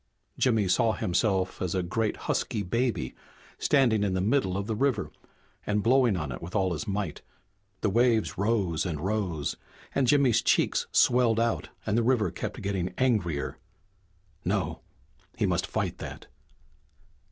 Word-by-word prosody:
Jimmy 110 Hz, -6 st, +2 dB
saw 115 Hz, +4 st, +3 dB
himself 95 Hz, +1 st, 0 dB
as 90 Hz, -1 st, -1 dB
a 90 Hz, -, 0 dB
great 105 Hz, +5 st, -1 dB
husky 105 Hz, -, -1 dB
baby, 115 Hz, -, -1 dB, 0.5 s
standing 120 Hz, -7 st, +3 dB
in 95 Hz, -2 st, 0 dB
the -, -, 0 dB
middle 95 Hz, -2 st, +1 dB
of 100 Hz, -, -2 dB
the 110 Hz, -, -2 dB
river 115 Hz, -5 st, 0 dB, 0.5 s
and 105 Hz, 0 st, 0 dB
blowing 120 Hz, -4 st, +4 dB
on 75 Hz, -5 st, -3 dB
it -, -, -6 dB
with 90 Hz, +4 st, -8 dB
all 95 Hz, -3 st, +2 dB
his 85 Hz, +8 st, -5 dB
might. 100 Hz, -5 st, -3 dB, 0.6 s
The 105 Hz, -, +2 dB
waves 115 Hz, 0 st, +2 dB
rose 100 Hz, -6 st, 0 dB
and 80 Hz, -5 st, -3 dB
rose, 90 Hz, -6 st, -2 dB, 0.4 s
and 135 Hz, -2 st, +2 dB
Jimmy's 135 Hz, -4 st, +4 dB
cheeks -, -, +2 dB
swelled 120 Hz, -2 st, +4 dB
out 115 Hz, 0 st, 0 dB, 0.2 s
and 105 Hz, -, 0 dB
the 120 Hz, -, +3 dB
river 115 Hz, -6 st, +2 dB
kept -, -, -5 dB
getting 95 Hz, -3 st, -2 dB
angrier. 105 Hz, -, 0 dB, 0.8 s
No -, -, -1 dB, 0.6 s
he -, -, +1 dB
must -, -, 0 dB
fight -, -, -2 dB
that. -, -, -8 dB
105 Hz, 150 wpm, -28 LUFS, 90-115 Hz, 0.8 s, blowing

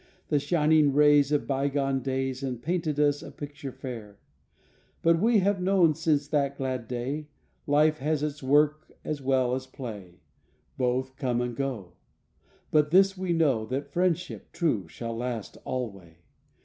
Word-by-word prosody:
The 150 Hz, -, +3 dB
shining 150 Hz, -1 st, +3 dB
rays 145 Hz, 0 st, +5 dB
Of 150 Hz, -, +1 dB
bygone 135 Hz, 0 st, 0 dB
days 130 Hz, 0 st, -2 dB
And 130 Hz, -3 st, -3 dB
painted 160 Hz, +1 st, -1 dB
us 145 Hz, -1 st, +2 dB
a -, -, -9 dB
picture 145 Hz, -2 st, -8 dB
fair 115 Hz, -6 st, -8 dB, 0.9 s
But 165 Hz, 0 st, +4 dB
we 225 Hz, +4 st, +4 dB
have 195 Hz, 0 st, +1 dB
known 180 Hz, -4 st, +4 dB
since 150 Hz, -2 st, 0 dB
that 140 Hz, -2 st, 0 dB
glad 130 Hz, -3 st, -3 dB
day 130 Hz, +5 st, -3 dB, 0.4 s
Life 155 Hz, +2 st, +3 dB
has 150 Hz, +1 st, 0 dB
its 150 Hz, -1 st, -3 dB
work 150 Hz, +3 st, +2 dB
as 150 Hz, -2 st, -3 dB
well 130 Hz, -2 st, +1 dB
as 130 Hz, 0 st, -3 dB
play 105 Hz, -9 st, -9 dB, 0.5 s
Both 130 Hz, +1 st, -1 dB
come 125 Hz, -4 st, 0 dB
and 125 Hz, -1 st, -2 dB
go, 120 Hz, -9 st, -4 dB, 0.8 s
But 150 Hz, -1 st, +3 dB
this 195 Hz, +3 st, +5 dB
we 185 Hz, -1 st, -2 dB
know 145 Hz, -9 st, +2 dB
That 140 Hz, +3 st, -4 dB
friendship 180 Hz, +1 st, -1 dB
true 120 Hz, -, 0 dB
shall 115 Hz, +6 st, -6 dB
last 120 Hz, -2 st, -4 dB
alway. 100 Hz, -10 st, -5 dB
140 Hz, 150 wpm, -27 LUFS, 125-155 Hz, 0.9 s, rays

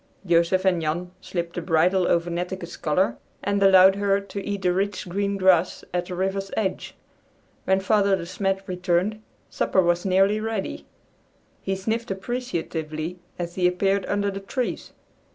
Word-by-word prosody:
Joseph 170 Hz, +2 st, +3 dB
and 180 Hz, -3 st, +3 dB
Jan 170 Hz, +3 st, -2 dB
slipped 170 Hz, -2 st, -4 dB
the 175 Hz, -, -3 dB
bridle 175 Hz, +2 st, +2 dB
over 170 Hz, 0 st, +1 dB
Netteke's 175 Hz, 0 st, -4 dB
collar 175 Hz, +6 st, 0 dB, 0.3 s
and 200 Hz, 0 st, 0 dB
allowed 190 Hz, 0 st, +7 dB
her 200 Hz, -1 st, +2 dB
to 200 Hz, 0 st, -6 dB
eat 200 Hz, -1 st, -4 dB
the 180 Hz, -1 st, +3 dB
rich 195 Hz, +1 st, -2 dB
green 200 Hz, +2 st, -1 dB
grass 185 Hz, -2 st, +3 dB
at 175 Hz, 0 st, -1 dB
the 180 Hz, -, -5 dB
river's 195 Hz, +1 st, -2 dB
edge. 195 Hz, -4 st, -2 dB, 0.7 s
When 190 Hz, 0 st, +3 dB
Father 200 Hz, 0 st, +3 dB
De 175 Hz, -3 st, -5 dB
Smet 195 Hz, +2 st, -2 dB
returned, 180 Hz, +3 st, 0 dB, 0.3 s
supper 190 Hz, -, +2 dB
was 175 Hz, 0 st, +1 dB
nearly 195 Hz, +2 st, +3 dB
ready. 220 Hz, -2 st, -4 dB, 0.7 s
He 195 Hz, -, -2 dB
sniffed 225 Hz, +5 st, -2 dB
appreciatively 180 Hz, -7 st, -4 dB, 0.2 s
as 175 Hz, -1 st, -4 dB
he 180 Hz, -1 st, +2 dB
appeared 195 Hz, +2 st, +1 dB
under 200 Hz, 0 st, 0 dB
the 195 Hz, -, -5 dB
trees. 240 Hz, +6 st, -4 dB
190 Hz, 155 wpm, -24 LUFS, 175-200 Hz, 0.7 s, allowed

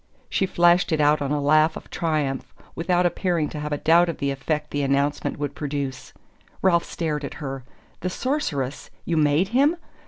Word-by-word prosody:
She 190 Hz, -, +1 dB
flashed 175 Hz, 0 st, +3 dB
it 160 Hz, -, +1 dB
out 150 Hz, 0 st, +3 dB
on 140 Hz, -, -1 dB
a 150 Hz, -, +1 dB
laugh 155 Hz, +2 st, +3 dB
of -, -, -12 dB
triumph, 150 Hz, -5 st, -1 dB, 0.2 s
without 175 Hz, +1 st, +1 dB
appearing 175 Hz, -2 st, 0 dB
to 150 Hz, -, -6 dB
have 150 Hz, 0 st, -4 dB
a 145 Hz, -, 0 dB
doubt 170 Hz, +3 st, +4 dB
of 165 Hz, -, -3 dB
the 140 Hz, 0 st, -1 dB
effect 150 Hz, +2 st, -3 dB
the 145 Hz, -, -1 dB
announcement 140 Hz, +1 st, 0 dB
would 145 Hz, 0 st, -3 dB
produce. 140 Hz, -3 st, -4 dB, 0.5 s
Ralph 170 Hz, -3 st, +3 dB
stared 150 Hz, -3 st, -3 dB
at 140 Hz, -, -5 dB
her. 135 Hz, -3 st, -6 dB, 0.4 s
"The 185 Hz, -, -2 dB
Sorceress? 175 Hz, -, -2 dB, 0.2 s
You 170 Hz, -, 0 dB
MADE 155 Hz, +4 st, +3 dB
him?" 280 Hz, +8 st, +3 dB
150 Hz, 185 wpm, -24 LUFS, 145-175 Hz, 0.5 s, doubt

